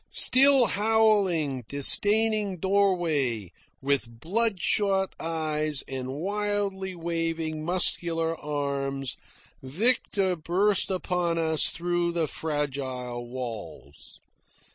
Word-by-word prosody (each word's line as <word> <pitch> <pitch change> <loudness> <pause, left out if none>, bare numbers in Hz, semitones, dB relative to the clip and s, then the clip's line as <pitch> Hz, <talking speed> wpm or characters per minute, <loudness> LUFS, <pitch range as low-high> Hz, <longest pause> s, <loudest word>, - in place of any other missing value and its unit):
Still 270 -1 +6
howling, 200 - +1
disdaining 205 +7 +2
doorways, 165 - 0 0.3
with 130 -4 -2
blood 210 - 0
shot 195 -1 0
eyes 155 -2 -2
and 130 -1 -5
wildly 200 +1 -2
waving 165 -2 -3
muscular 165 -1 +1
arms, 140 -3 -3 0.5
Victor 190 - +2
burst 185 +5 0
upon 180 -2 -1
us 160 -1 +1
through 175 0 -2
the 170 -2 0
fragile 130 -6 -4
walls. 115 - -9
165 Hz, 85 wpm, -26 LUFS, 140-195 Hz, 0.5 s, Still